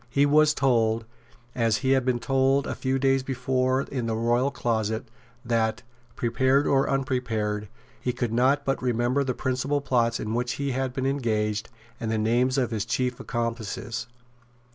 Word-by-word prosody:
He 140 +3 +3
was 150 +1 +4
told, 115 -4 +2 0.5
as 115 -3 +2
he 130 - +3
had 130 -2 +3
been 125 -2 +2
told 135 +2 +2
a - - -3
few 130 0 -1
days 135 0 +2
before 130 0 0
in 125 -5 -4
the 110 - -1
royal 120 +4 +2
closet, 110 -3 -1 0.4
that, 115 -1 0 0.3
prepared 130 +4 +2
or 135 -1 +2
unprepared, 120 -6 -1 0.3
he 125 - -1
could 120 -2 -2
not 135 +4 +2
but 135 - 0
remember 125 +2 +1
the 130 -2 -2
principal 130 +3 -1
plots 120 -4 +1
in 110 +1 -3
which 120 +1 -1
he 140 -1 -2
had 130 0 -1
been 130 +1 -3
engaged, 110 -6 -1 0.3
and 115 - -3
the 110 - 0
names 120 +4 +2
of 125 -3 +1
his 110 -3 -1
chief 125 +2 -1
accomplices. 115 -1 -3
125 Hz, 165 wpm, -26 LUFS, 115-135 Hz, 0.5 s, was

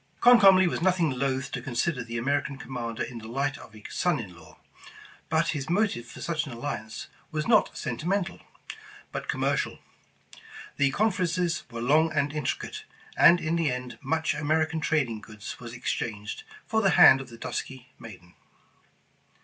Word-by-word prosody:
Comcomly 195 -7 +7
was 170 - -2
nothing 180 -4 +2
loath 130 +1 -2
to - - -4
consider 130 +1 -1
the 115 0 -5
Ameri 140 +4 +1
can 140 - -7
commander 120 -4 -4
in 120 -2 -7
the 110 - -10
light 135 +4 -2
of 110 - -14
a 105 - -14
son 175 -5 +1
in 95 -6 -8
law, 85 - -16 0.7
but 165 +1 +2
his 145 -2 -3
motive 175 - 0
for - - -11
such 155 -3 -2
an - - -7
alliance 115 -3 -5 0.2
was 155 -1 -3
not 225 -2 +3
sentimental, 175 - -2 0.7
but - - -5
commercial. - - -1 1.0
The 140 -1 +3
conferences 180 -3 0
were 115 -1 -6
long 155 +5 +4
and 145 -1 0
intricate, 150 -3 -3 0.3
and 175 +1 +7
in 160 +1 -1
the 165 -4 +1
end 125 0 -6
much 160 +3 0
American 160 +2 0
trading 135 -9 0
goods 110 -1 -9
was 120 -2 -8
ex 120 +1 -3
changed 105 -2 -5 0.2
for 220 -1 +1
the 195 - +4
hand 135 -7 +8
of 130 - -10
the 115 - -11
dusky 130 +2 -6
maiden. 90 -6 -12
140 Hz, 165 wpm, -27 LUFS, 120-165 Hz, 1.0 s, hand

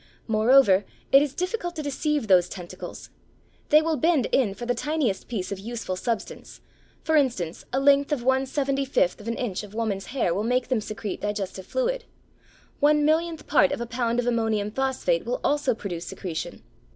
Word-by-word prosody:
Moreover 220 -2 +5 0.3
it 275 - +8
is 285 -2 -2
difficult 360 -1 -3
to 310 - -4
deceive 290 -1 -1
those 180 -3 +5
tentacles. 175 -2 -9 0.6
They 305 -1 +6
will 320 -1 0
bend 320 -5 +2
in 215 -7 +2
for 240 - -6
the 245 - +1
tiniest 280 -6 -1
piece 200 -6 -4
of 200 - -4
useful 225 -2 -4
substance; 225 +4 -4 0.4
for 320 - +1
instance, 235 - 0
a 265 - +1
length 280 +1 +4
of 275 -5 -1
one 265 +1 +2
seventy 275 0 0
fifth 235 -8 +1
of 210 - -11
an 230 - -1
inch 220 -7 -2
of 210 0 -11
woman's 205 -4 -2
hair 245 -10 0
will 195 - -1
make 250 +2 0
them 250 -4 +1
secrete 210 -1 -5
digestive 200 -2 -4
fluid. - - -1 0.7
One 295 0 +4
millionth 320 +1 +1
part 190 -10 +4
of - - -2
a 235 - -3
pound 235 0 -1
of 245 - 0
ammonium 220 -3 0
phosphate 265 - 0
will - - -2
also 285 -4 +1
produce 175 -6 -6
secretion. 170 -5 -6
245 Hz, 185 wpm, -25 LUFS, 210-290 Hz, 0.7 s, it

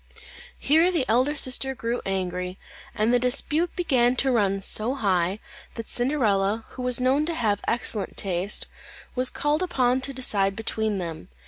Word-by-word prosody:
Here 320 +5 +3
the 325 -8 0
elder 255 +6 +2
sister 265 -1 +3
grew 235 0 -3
angry, 180 -1 -3 0.4
and 220 +3 +1
the 245 - +4
dispute 295 +7 0
began 255 -8 +2
to 265 +1 +2
run 200 -5 +1
so 220 +6 +1
high, 190 -6 0 0.4
that 230 -1 -7
Cinderella, 225 -5 +1
who 255 - -9
was 250 0 +3
known 260 +4 +2
to 335 - -1
have 210 -6 0
excellent 225 -3 -1
taste, 190 +1 0 0.5
was 255 0 +2
called 295 +3 -1
upon 260 -8 +1
to 275 - 0
decide 200 -7 0
between 220 -1 -2
them. 165 - -6
240 Hz, 155 wpm, -24 LUFS, 200-265 Hz, 0.5 s, the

